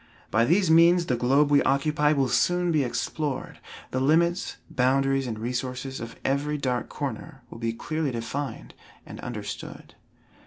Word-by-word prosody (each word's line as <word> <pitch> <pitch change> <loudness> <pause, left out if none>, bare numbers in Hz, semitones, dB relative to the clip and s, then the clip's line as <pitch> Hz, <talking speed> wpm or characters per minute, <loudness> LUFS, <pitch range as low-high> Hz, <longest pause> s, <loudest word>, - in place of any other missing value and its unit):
By 110 +2 +3
these 175 +4 +3
means 170 +2 +6
the 125 - 0
globe 135 +5 +3
we 145 - +6
occupy 150 +2 +2
will 140 -3 +2
soon 175 +6 +2
be 155 -3 +2
explored, 135 +3 -3 0.3
the 130 - -1
limits, 170 +6 +2
boundaries 135 +1 +1
and 110 -2 -4
resources 125 +3 -4
of 115 0 -7
every 145 +2 0
dark 125 -4 -2
corner 135 -1 -6 0.2
be 115 -1 -1
clearly 155 +6 -2
defined 130 +4 -5 0.3
and - - -10
understood. - - -7
135 Hz, 145 wpm, -26 LUFS, 125-155 Hz, 0.3 s, means